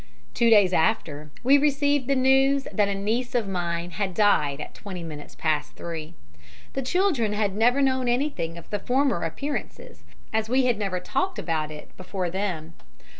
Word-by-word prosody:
"Two 235 Hz, -1 st, +3 dB
days 205 Hz, -5 st, +6 dB
after 155 Hz, -5 st, 0 dB
we 275 Hz, +3 st, +6 dB
received 285 Hz, -2 st, +2 dB
the 275 Hz, -, +2 dB
news 270 Hz, +1 st, +3 dB
that 205 Hz, -2 st, +2 dB
a 200 Hz, -, -1 dB
niece 230 Hz, +6 st, -2 dB
of 230 Hz, -4 st, +1 dB
mine 175 Hz, -2 st, -2 dB
had 190 Hz, +1 st, -3 dB
died 150 Hz, -10 st, +3 dB
at -, -, -7 dB
twenty 185 Hz, -4 st, -7 dB
minutes 150 Hz, -3 st, -9 dB
past 155 Hz, -2 st, -1 dB
three. 165 Hz, -1 st, -6 dB, 0.6 s
The 270 Hz, -, -2 dB
children 270 Hz, -, +1 dB
had 205 Hz, -2 st, 0 dB
never 245 Hz, +6 st, +3 dB
known 260 Hz, -2 st, +1 dB
anything 240 Hz, -, -1 dB
of 170 Hz, -, -11 dB
the 205 Hz, -, -1 dB
former 255 Hz, -4 st, +1 dB
appearances, 290 Hz, -, -5 dB, 0.3 s
as 220 Hz, 0 st, 0 dB
we 260 Hz, +1 st, +3 dB
had 240 Hz, -4 st, +1 dB
never 195 Hz, -3 st, -1 dB
talked 375 Hz, -, -2 dB
about 155 Hz, -2 st, -2 dB
it 150 Hz, -1 st, -11 dB
before 185 Hz, -1 st, -4 dB
them. 175 Hz, -4 st, -3 dB
210 Hz, 175 wpm, -25 LUFS, 170-260 Hz, 0.6 s, days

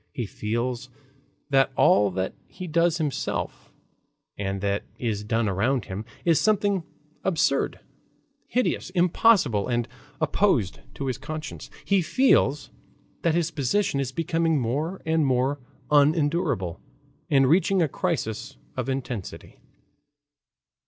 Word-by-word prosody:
He 120 Hz, -, -3 dB
feels 120 Hz, +5 st, -3 dB, 0.6 s
that 135 Hz, 0 st, +4 dB
all 100 Hz, 0 st, +5 dB
that 95 Hz, 0 st, -2 dB
he 185 Hz, -, -8 dB
does 170 Hz, 0 st, +2 dB
himself 150 Hz, -4 st, -3 dB, 0.6 s
and 100 Hz, -1 st, -3 dB
that 100 Hz, 0 st, 0 dB
is 110 Hz, -4 st, -2 dB
done 115 Hz, +1 st, 0 dB
around 110 Hz, +5 st, +1 dB
him 100 Hz, +4 st, -6 dB, 0.2 s
is 165 Hz, -2 st, +4 dB
something 205 Hz, -3 st, +2 dB, 0.4 s
absurd, 190 Hz, 0 st, +1 dB, 0.7 s
hideous, 250 Hz, -5 st, 0 dB
impossible, 180 Hz, -, +3 dB
and 120 Hz, -2 st, 0 dB, 0.3 s
opposed 90 Hz, -2 st, +1 dB, 0.2 s
to 140 Hz, -, -4 dB
his 130 Hz, -1 st, -2 dB
conscience; 155 Hz, +1 st, -6 dB, 0.2 s
he 195 Hz, -1 st, +3 dB
feels 155 Hz, -, +2 dB, 0.5 s
that 165 Hz, -1 st, +2 dB
his 170 Hz, -2 st, +1 dB
position 145 Hz, +2 st, 0 dB
is 135 Hz, -2 st, -2 dB
becoming 165 Hz, +1 st, +1 dB
more 145 Hz, +10 st, -2 dB
and 160 Hz, 0 st, +2 dB
more 135 Hz, +1 st, +1 dB, 0.3 s
unendurable 145 Hz, -, +2 dB, 0.5 s
and 135 Hz, -2 st, +4 dB
reaching 185 Hz, +5 st, +3 dB
a -, -, +2 dB
crisis 150 Hz, -, -3 dB, 0.2 s
of 130 Hz, 0 st, -3 dB
intensity. 125 Hz, -7 st, -5 dB
140 Hz, 120 wpm, -25 LUFS, 115-170 Hz, 0.7 s, all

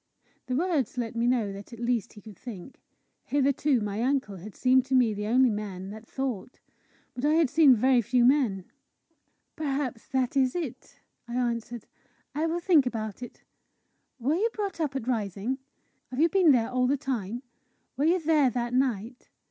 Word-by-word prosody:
The 255 Hz, -, -1 dB
words 315 Hz, -5 st, 0 dB
let 235 Hz, -2 st, -3 dB
me 230 Hz, +1 st, +1 dB
know 230 Hz, -5 st, +1 dB
that 200 Hz, +3 st, -10 dB
at 235 Hz, -, -10 dB
least 235 Hz, -2 st, -1 dB
he 210 Hz, -, -13 dB
could 210 Hz, 0 st, -12 dB
think. 215 Hz, +2 st, -10 dB, 0.4 s
Hitherto 280 Hz, -2 st, +2 dB
my 210 Hz, +1 st, -3 dB
uncle 255 Hz, -6 st, 0 dB
had 195 Hz, +4 st, -10 dB
seemed 255 Hz, 0 st, +4 dB
to 265 Hz, 0 st, 0 dB
me 240 Hz, -4 st, +4 dB
the 210 Hz, 0 st, -4 dB
only 250 Hz, +2 st, +4 dB
man 200 Hz, -2 st, -5 dB
that 220 Hz, +2 st, -10 dB
thought. 255 Hz, -4 st, -4 dB, 0.5 s
But 250 Hz, -, -7 dB
I 300 Hz, +2 st, +3 dB
had 320 Hz, -5 st, +3 dB
seen 295 Hz, -4 st, +6 dB
very 250 Hz, +2 st, +3 dB
few 240 Hz, +2 st, +2 dB
men. 245 Hz, -9 st, +2 dB, 0.9 s
"Perhaps 275 Hz, -6 st, -3 dB
that 260 Hz, 0 st, -1 dB
is 260 Hz, -2 st, +2 dB
it," 280 Hz, -3 st, -6 dB, 0.3 s
I 235 Hz, -, -5 dB
answered. 235 Hz, -2 st, -2 dB, 0.5 s
"I 310 Hz, +4 st, 0 dB
will 335 Hz, +2 st, -1 dB
think 335 Hz, -7 st, +4 dB
about 220 Hz, -3 st, -4 dB
it. 245 Hz, -, -10 dB, 0.8 s
Were 260 Hz, +5 st, +1 dB
you 415 Hz, +8 st, +1 dB
brought 400 Hz, -5 st, -4 dB
up 290 Hz, -3 st, -1 dB
at 255 Hz, -3 st, -4 dB
Rising? 220 Hz, +2 st, -2 dB, 0.5 s
Have 255 Hz, -, -5 dB
you 330 Hz, +2 st, +5 dB
been 360 Hz, -3 st, +5 dB
there 240 Hz, -2 st, +2 dB
all 250 Hz, 0 st, +2 dB
the 280 Hz, +2 st, +2 dB
time? 245 Hz, -4 st, -4 dB, 0.5 s
Were 280 Hz, +4 st, 0 dB
you 350 Hz, +3 st, +3 dB
there 305 Hz, -4 st, +3 dB
that 240 Hz, -1 st, -3 dB
night? 245 Hz, -2 st, -1 dB
250 Hz, 180 wpm, -27 LUFS, 225-280 Hz, 0.9 s, seen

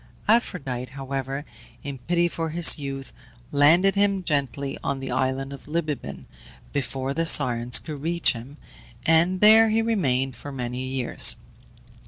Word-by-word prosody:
Aphrodite, 135 Hz, -, -1 dB
however, 135 Hz, +1 st, -5 dB, 0.4 s
in 140 Hz, -2 st, -7 dB
pity 175 Hz, +6 st, 0 dB
for 165 Hz, -1 st, -4 dB
his 165 Hz, 0 st, +4 dB
youth, 135 Hz, -1 st, -7 dB, 0.4 s
landed 165 Hz, +7 st, +4 dB
him 200 Hz, -1 st, 0 dB
gently 140 Hz, -3 st, -2 dB
on 140 Hz, -1 st, -3 dB
the 135 Hz, -1 st, -6 dB
island 130 Hz, +2 st, -2 dB
of 140 Hz, -, -13 dB
Libibaon 150 Hz, -, -5 dB, 0.5 s
before 135 Hz, -1 st, -3 dB
the 165 Hz, +2 st, -2 dB
Sirens 125 Hz, -5 st, +4 dB
could 150 Hz, -4 st, -6 dB
reach 170 Hz, +2 st, +1 dB
him, 125 Hz, +5 st, -11 dB, 0.5 s
and 170 Hz, +3 st, +2 dB
there 220 Hz, +1 st, +6 dB
he 225 Hz, +1 st, +1 dB
remained 135 Hz, -, -1 dB
for 145 Hz, -, -10 dB
many 125 Hz, -1 st, -5 dB
years. 130 Hz, -2 st, +5 dB
140 Hz, 140 wpm, -23 LUFS, 130-170 Hz, 0.5 s, there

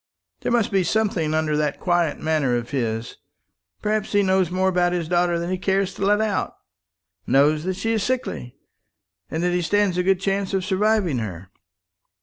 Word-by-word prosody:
There -, -, -2 dB
must 235 Hz, -3 st, +2 dB
be 195 Hz, -2 st, +2 dB
something 180 Hz, -7 st, 0 dB
under 155 Hz, -1 st, 0 dB
that 150 Hz, -1 st, -1 dB
quiet 175 Hz, -4 st, +1 dB
manner 155 Hz, -6 st, +1 dB
of 120 Hz, 0 st, -4 dB
his. 115 Hz, -3 st, -2 dB, 0.7 s
Perhaps 215 Hz, 0 st, -1 dB
he 205 Hz, 0 st, +4 dB
knows 190 Hz, -2 st, +2 dB
more 185 Hz, +1 st, 0 dB
about 175 Hz, -1 st, +1 dB
his 170 Hz, -3 st, -2 dB
daughter 175 Hz, 0 st, +2 dB
than 170 Hz, +1 st, -3 dB
he 185 Hz, -, -2 dB
cares 190 Hz, 0 st, 0 dB
to -, -, -5 dB
let 205 Hz, +1 st, +3 dB
out; 215 Hz, -3 st, -1 dB, 0.7 s
knows 150 Hz, +3 st, +3 dB
that 185 Hz, 0 st, -1 dB
she 225 Hz, +4 st, -2 dB
is 220 Hz, -, 0 dB
sickly, 90 Hz, -, -3 dB, 0.7 s
and 160 Hz, +2 st, -2 dB
that 180 Hz, 0 st, +1 dB
he 180 Hz, -, +1 dB
stands 195 Hz, 0 st, +1 dB
a -, -, +2 dB
good 190 Hz, 0 st, +2 dB
chance 195 Hz, 0 st, -1 dB
of 190 Hz, -1 st, -1 dB
surviving 200 Hz, -, +1 dB
her." 95 Hz, -4 st, -6 dB
180 Hz, 185 wpm, -23 LUFS, 155-195 Hz, 0.7 s, he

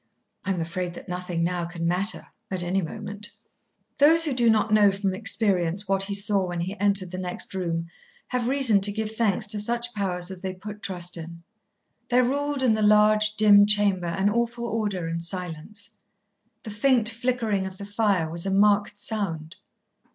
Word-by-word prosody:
"I -, -, -5 dB
am 190 Hz, -2 st, -1 dB
afraid 175 Hz, +1 st, -4 dB
that -, -, -11 dB
nothing, 180 Hz, -1 st, -3 dB
now, 175 Hz, 0 st, -1 dB
can 170 Hz, -1 st, -6 dB
matter 185 Hz, +5 st, -1 dB, 0.2 s
at 185 Hz, -2 st, -2 dB
any 185 Hz, +2 st, -1 dB
moment." 205 Hz, +3 st, -7 dB, 0.7 s
Those 325 Hz, +3 st, +5 dB
who 295 Hz, -, -1 dB
do 240 Hz, -2 st, +3 dB
not 215 Hz, -1 st, +2 dB
know 205 Hz, -2 st, +5 dB
from 195 Hz, -1 st, -2 dB
experience 195 Hz, -3 st, +1 dB
what 195 Hz, 0 st, +1 dB
he 200 Hz, +1 st, -1 dB
saw 200 Hz, -2 st, +1 dB
when 175 Hz, -1 st, -4 dB
he 185 Hz, +4 st, -4 dB
entered 200 Hz, -3 st, +1 dB
the 185 Hz, -, -5 dB
next 180 Hz, +1 st, -4 dB
room 170 Hz, -3 st, -3 dB, 0.4 s
have 250 Hz, -2 st, -2 dB
reason 255 Hz, -7 st, +3 dB
to 205 Hz, +1 st, +8 dB
give 215 Hz, +1 st, -3 dB
thanks 220 Hz, -1 st, +1 dB
to 210 Hz, 0 st, -2 dB
such 235 Hz, +3 st, -1 dB
powers 185 Hz, -3 st, -3 dB
as 185 Hz, -1 st, -7 dB
they 185 Hz, -1 st, -5 dB
put 210 Hz, +2 st, -10 dB
trust 180 Hz, -2 st, -4 dB
in. 170 Hz, +1 st, -10 dB, 0.7 s
There 250 Hz, 0 st, +3 dB
ruled 285 Hz, +2 st, -1 dB
in 245 Hz, -4 st, +3 dB
the 215 Hz, -, -1 dB
large, 215 Hz, 0 st, +4 dB
dim 205 Hz, -1 st, +6 dB
chamber 200 Hz, -4 st, +2 dB
an 190 Hz, +4 st, 0 dB
awful 235 Hz, +1 st, -2 dB
order 210 Hz, -6 st, -2 dB
and 165 Hz, 0 st, -4 dB
silence. 180 Hz, +4 st, -1 dB, 0.7 s
The 215 Hz, -, -7 dB
faint 230 Hz, +2 st, +2 dB
flickering 230 Hz, -4 st, -1 dB
of 190 Hz, 0 st, -10 dB
the 200 Hz, -, -8 dB
fire 205 Hz, -5 st, 0 dB
was 170 Hz, +3 st, -2 dB
a -, -, -1 dB
marked 205 Hz, +1 st, +2 dB
sound. 170 Hz, -7 st, -4 dB
200 Hz, 185 wpm, -24 LUFS, 180-215 Hz, 0.7 s, to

